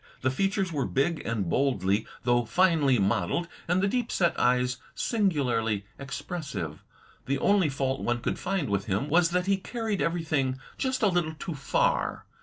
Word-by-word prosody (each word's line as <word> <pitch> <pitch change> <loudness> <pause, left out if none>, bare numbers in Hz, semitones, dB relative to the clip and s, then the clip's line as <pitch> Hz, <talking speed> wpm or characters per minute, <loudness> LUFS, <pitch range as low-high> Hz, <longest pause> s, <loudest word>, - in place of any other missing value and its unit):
The 130 - +1
features 195 +3 0
were 140 -3 0
big 155 +5 0
and 110 -5 -1
boldly, 100 -2 +1 0.2
though 120 0 +3
finely, 145 +1 +3
modeled, 105 - +1 0.2
and 180 +3 +2
the - - +4
deep 240 +2 -1
set 170 -2 +2
eyes 125 0 +2 0.2
singularly 125 - 0
expressive. 140 - -5 0.4
The 140 +1 +1
only 195 +1 +3
fault 135 -1 -1
one 120 0 0
could - - -2
find 190 -8 -1
with 100 -2 -1
him 105 +9 -1
was 165 +1 +4
that 180 +1 0
he 195 0 +2
carried 220 0 -3
eveiything 155 -6 0 0.2
just 260 -2 -1
a - - +6
little 175 -4 0
too 170 +2 -5
far. 140 -2 0
145 Hz, 165 wpm, -28 LUFS, 125-180 Hz, 0.4 s, a